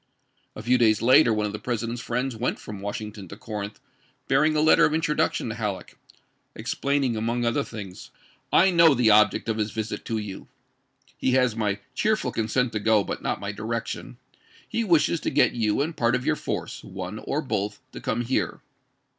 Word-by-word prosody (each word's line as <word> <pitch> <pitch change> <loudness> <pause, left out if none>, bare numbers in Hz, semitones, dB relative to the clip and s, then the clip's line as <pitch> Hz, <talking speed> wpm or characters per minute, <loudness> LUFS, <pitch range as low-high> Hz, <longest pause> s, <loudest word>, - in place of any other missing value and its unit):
" - - -43
A 105 - -8
few 125 +2 +3
days 110 -3 +4
later 125 +1 +6
one 105 -1 +1
of 105 - -2
the 105 - -5
President's 115 +1 -3
friends 125 +2 -2
went 120 +3 -1
from 105 -2 -9
Washing 105 +1 -4
ton 100 -3 -10
to 100 - -10
Corinth 105 -2 -6 0.5
bearing 155 +3 +3
a - - +2
letter 155 +1 +5
of 155 - +3
introduction 150 -6 0
to - - -3
Halleck, 105 -4 -4 0.6
explaining 140 -4 -1
among 115 +2 -1
other 120 +5 +1
things: 100 -7 -9 0.2
" - - -34
I 190 +2 +5
know 165 -4 +6
the 120 -3 +4
object 105 +2 +4
of 110 -1 -1
his 105 0 0
visit 110 +1 -4
to 115 - -2
you. 105 -3 -6 0.7
He 130 - +1
has 125 -3 +3
my 105 -3 -1
cheerful 220 -1 0
consent 115 +2 0
to 105 - -2
go, 110 -1 +3
but - - -5
not - - -2
my 100 0 -4
direction. 110 - -5 0.5
He 230 - -1
wishes 170 -3 +3
to - - -2
get - - +3
you 110 0 0
and 160 +2 -4
part 120 0 +2
of 125 - -3
your - - +2
force, - - -5
one 95 +2 -6
or 145 - -2
both, 105 -8 -2
to - - -9
come - - -1
here. 120 +2 -1
115 Hz, 200 wpm, -25 LUFS, 105-130 Hz, 0.7 s, later